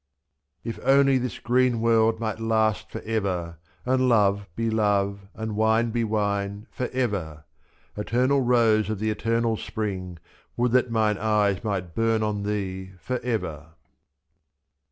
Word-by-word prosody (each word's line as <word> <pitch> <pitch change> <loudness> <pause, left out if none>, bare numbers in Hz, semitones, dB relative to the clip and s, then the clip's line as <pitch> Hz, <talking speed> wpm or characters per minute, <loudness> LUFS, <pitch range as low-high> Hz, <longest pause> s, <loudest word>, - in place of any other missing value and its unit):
If 115 -1 -5
only 135 0 +4
this 125 -1 -4
green 125 0 +2
world 115 -1 +3
might 110 -1 -3
last 110 -2 +1
for - - -6
ever. 90 -7 -2 0.3
And 130 0 +2
love 100 -3 +3
be 115 0 -1
love, 100 -2 0
and 110 -1 -4
wine 110 +2 +2
be 120 0 0
wine 100 -1 -1
for 125 - -3
ever! 100 -12 -2 0.5
2^' - - -2
Eternal 130 +6 +2
Rose 115 -4 +3
of 110 - -2
the 110 +2 -1
Eternal 115 +1 0
Spring, 95 -6 -4 0.4
Would 120 0 +1
that 125 0 +3
mine 110 -3 +1
eyes 105 -2 +1
might 95 -5 -3
burn 115 +1 +1
on 105 -1 -1
thee 95 -2 -4
for 120 +10 -3
ever. 80 -11 -4
110 Hz, 145 wpm, -25 LUFS, 100-115 Hz, 0.5 s, only